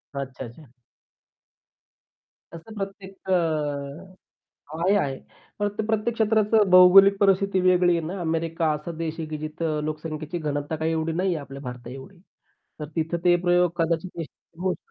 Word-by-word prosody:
अच्छा, 135 -1 -5
अच्छा! 125 +4 -14 1.8
असं 170 +7 -10
प्रत्येक 195 -1 -8
अ, - - +3 1.5
आहे 190 +4 +3
आहे. 135 -8 -1 0.4
प्रत्येक 205 +1 -2
प्रत्येक 220 +1 0
क्षेत्राचं 215 -2 +3
भौगोलिक 190 +2 +8
परिस्थिती 195 -1 +3
वेगळी 180 -1 +4
आहे 160 -1 -3
ना. 185 +2 -5
अमेरिका 165 -1 -1
असा 150 +3 -5
देश 160 -1 -3
आहे 160 - -4
की 155 - -5
जिथं 155 0 -3
लोकसंख्येची 155 +1 -4
घनता 150 0 -3
काही 160 +1 -1
एवढी 160 0 -1
नाहीये 180 +1 0
आपल्या 140 -1 -9
भारताएवढी. 125 +8 -9 0.6
तर 150 - -4
तिथं 165 +1 -1
ते 175 -1 +5
प्रयोग 175 0 +3
कदाचित 165 +1 -1
यशस्वी 165 +1 -11
होवू 185 -1 +1
शकता. - - -11
170 Hz, 145 wpm, -24 LUFS, 155-190 Hz, 1.8 s, भौगोलिक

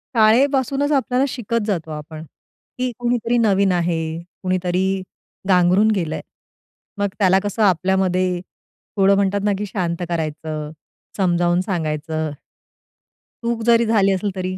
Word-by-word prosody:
शाळेपासूनच 270 +5 +3
आपल्याला 265 -2 +2
शिकत 230 -3 -2
जातो 165 -6 -2
आपण. 155 +1 -7 0.5
की 255 0 -1
कुणीतरी 240 0 0
नवीन 200 -4 +3
आहे. 170 -2 0 0.4
कुणीतरी 185 0 0 0.6
गांगरून 185 +4 +4
गेलंय. 165 -4 -2 0.8
मग 205 0 +1
त्याला 190 -1 +4
कसं 205 +2 -1
आपल्यामध्ये 185 -1 +1 0.6
थोडं 195 0 +5
म्हणतात 200 0 +1
ना 210 - +2
की 210 - -3
शांत 175 -3 -3
करायचं, 155 -2 -3 0.5
समजावून 175 -1 +2
सांगायचं. 160 -4 -2 1.1
चूक 235 -1 -1
जरी 235 0 +5
झाली 205 -3 +3
असेल 195 +1 -2
तरी 185 0 -3
190 Hz, 120 wpm, -20 LUFS, 175-220 Hz, 1.1 s, थोडं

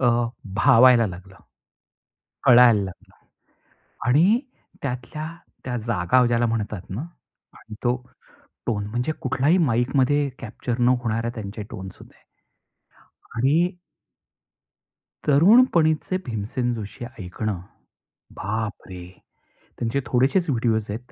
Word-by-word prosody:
अ, 130 - +2 0.5
भावायला 115 +3 +6
लागलं, 95 0 -10 1.1
कळायला 120 -3 +7
लागलं 95 -2 -10 0.9
आणि 170 - +4 0.4
त्यातल्या 135 +4 -5 0.4
त्या 125 -1 -2
जागा 115 +4 +3
ज्याला 120 0 +2
म्हणतात 105 -4 -3
ना 105 +9 -4 0.8
तो 120 0 +2 0.7
टोन, 105 -3 -1
म्हणजे 120 +7 -2
कुठल्याही 140 +4 +2
माईकमध्ये 135 0 +2
कॅप्चर 120 +1 -5
न 120 - +3
होणाऱ्या 115 0 -1
त्यांच्या 105 0 -6
टोन्स 95 0 -8
होते - - -17 1.2
आणि 150 +9 +2 1.6
तरुणपणीचे 165 - +4
भीमसेन 120 +2 -2
जोशी 110 +2 -7 0.2
ऐकणं, 95 +2 -4 0.8
बापरे! 100 -3 -5 0.7
त्यांचे 120 +4 -1
थोडेसेच 140 +8 +1
व्हिडिओस 115 -4 0
आहेत. 120 +4 -7
120 Hz, 95 wpm, -23 LUFS, 110-135 Hz, 1.6 s, कळायला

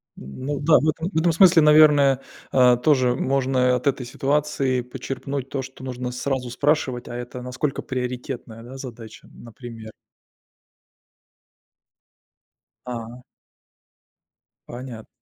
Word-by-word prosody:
Ну 130 - -6
да, 150 +2 +5
в 155 - +1
этом 165 +4 -2
в - - -2
этом 170 +1 +3
смысле, 175 0 +6
наверное, 150 -3 +6 0.3
а, 125 -1 +5
тоже 130 -2 +2
можно 130 -1 +1
и - - +4
от 125 +1 -1
этой 130 -2 0
ситуации 135 -1 0
подчерпнуть 135 +2 -5
то, 135 - -3
что 130 0 -11
нужно 125 -1 -4
сразу 125 0 -3
спрашивать, 130 -2 0
а 120 - -7
это 125 +1 -7
насколько 130 +3 -3
приоритетная, 125 -2 -5
да, 130 +3 -10
задача, 115 -4 -10
например. 115 -1 -11 2.9
А. 120 0 -7 1.5
Понятно. 120 -2 -9
130 Hz, 120 wpm, -23 LUFS, 125-140 Hz, 2.9 s, смысле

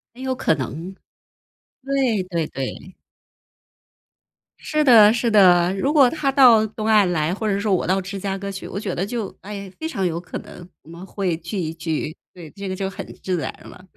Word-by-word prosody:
很 255 - -11
有 260 -1 -2
可 160 - +1
能 160 +8 -6 0.9
对 265 -8 0
对 170 -4 -2
对。 135 +7 -6 1.6
是 305 0 0
的 220 -6 +8
是 235 0 0
的， 180 -3 +5
如 275 +9 0
果 275 -5 +6
他 300 -4 -1
到 245 -5 +6
东 215 +1 -6
岸 210 -4 +4
来， 160 +1 0
或 215 +2 -3
者 200 -1 0
说 205 -2 0
我 180 - +1
到 190 +1 +2
芝 195 +1 -6
加 195 0 -3
哥 200 0 -5
去， 190 - -7
我 200 - -5
觉 200 -4 -4
得 185 - -2
就， 225 -3 -5
哎， 200 -1 -7
非 320 - -3
常 195 - -2
有 170 -1 -1
可 180 - -7
能 175 - -12 0.2
我 160 - -18
们 170 +3 -10
会 190 -4 -2
聚 170 +5 -6
一 160 -2 -3
聚， 160 -1 -3 0.2
对， 170 -4 -11
这 200 -1 -7
个 185 - -3
就 190 0 -3
很 195 - -7 0.2
自 185 -2 -1
然 - - -3
了。 185 - -13
195 Hz, 220 characters per minute, -22 LUFS, 175-220 Hz, 1.6 s, 的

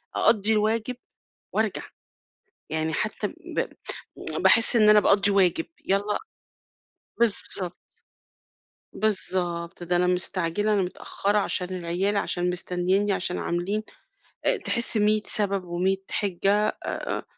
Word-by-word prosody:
أقضي 220 -1 +2
الواجب 220 +3 -1 0.6
وأرجع، - - -1 0.9
يعني 160 0 -1
حتى 215 +7 -2
ب - - -6 0.7
باحس 230 +1 +6
إن 215 -2 +4
أنا 210 - +6
باقضي 200 0 +4
واجب، 185 -4 +1 0.2
يالّا 200 +2 0 1.0
باِلضبط. 195 -5 +4 1.2
بالضبط، 180 -5 -2
ده 175 +1 0
أنا 180 +1 +1
مستعجلة، 180 +3 -1
أنا 200 - +1
متأخرة 200 +3 -2
علشان 185 -2 -1
العيال، 180 +4 -2
علشان 180 -2 -1
مستنيني 185 +3 -1
علشان 180 -1 -2
عاملين 185 +5 -3 0.6
آآ، - - +2
تحس 235 -1 +2
100 215 0 +2
سبب 200 -2 +3
و100 180 +3 -1
حِجّة 200 +1 0 0.2
آآ، - - -4
195 Hz, 110 wpm, -24 LUFS, 180-210 Hz, 1.2 s, باحس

